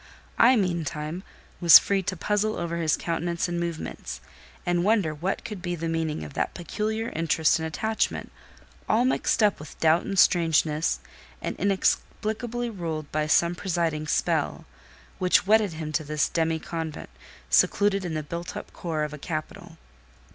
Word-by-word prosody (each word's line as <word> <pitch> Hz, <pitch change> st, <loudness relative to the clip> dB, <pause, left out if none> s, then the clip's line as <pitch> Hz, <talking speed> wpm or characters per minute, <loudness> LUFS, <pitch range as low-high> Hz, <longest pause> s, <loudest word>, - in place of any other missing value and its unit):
I, 250 Hz, +3 st, +7 dB
meantime, 170 Hz, -4 st, -2 dB, 0.4 s
was 170 Hz, -3 st, +10 dB
free 200 Hz, -1 st, +1 dB
to 185 Hz, 0 st, -3 dB
puzzle 210 Hz, +4 st, 0 dB
over 170 Hz, 0 st, -3 dB
his 160 Hz, -2 st, +1 dB
countenance 170 Hz, +1 st, -2 dB
and 175 Hz, 0 st, -2 dB
movements, 170 Hz, -, -5 dB, 0.5 s
and 175 Hz, 0 st, +1 dB
wonder 200 Hz, -6 st, +2 dB
what 175 Hz, +6 st, -3 dB
could 210 Hz, -5 st, -6 dB
be 175 Hz, -1 st, -2 dB
the 165 Hz, 0 st, -4 dB
meaning 160 Hz, -1 st, -2 dB
of 145 Hz, -, -9 dB
that -, -, -2 dB
peculiar 215 Hz, +6 st, -3 dB
interest 165 Hz, 0 st, +2 dB
and 160 Hz, -, -2 dB
attachment—all 220 Hz, +4 st, -2 dB
mixed 255 Hz, -3 st, +1 dB
up 205 Hz, -2 st, +3 dB
with 150 Hz, 0 st, -11 dB
doubt 160 Hz, +2 st, +4 dB
and 195 Hz, -, -4 dB
strangeness, 160 Hz, -, +3 dB, 0.4 s
and -, -, -4 dB
inexplicably 220 Hz, +5 st, -1 dB
ruled 165 Hz, -8 st, -5 dB
by 155 Hz, 0 st, 0 dB
some 170 Hz, +2 st, +3 dB
presiding 170 Hz, -4 st, -1 dB
spell—which 65 Hz, -, -1 dB
wedded 210 Hz, -3 st, +3 dB
him 155 Hz, -1 st, -5 dB
to 155 Hz, -, -1 dB
this 150 Hz, 0 st, 0 dB
demi 165 Hz, -1 st, 0 dB
convent, 160 Hz, -1 st, -6 dB, 0.4 s
secluded 200 Hz, -1 st, +3 dB
in 170 Hz, -3 st, -3 dB
the 155 Hz, -, -2 dB
built 170 Hz, +4 st, -6 dB
up -, -, -9 dB
core 160 Hz, -3 st, -3 dB
of 150 Hz, 0 st, -4 dB
a 150 Hz, -, -8 dB
capital. 165 Hz, +3 st, -6 dB
170 Hz, 155 wpm, -26 LUFS, 155-195 Hz, 0.5 s, was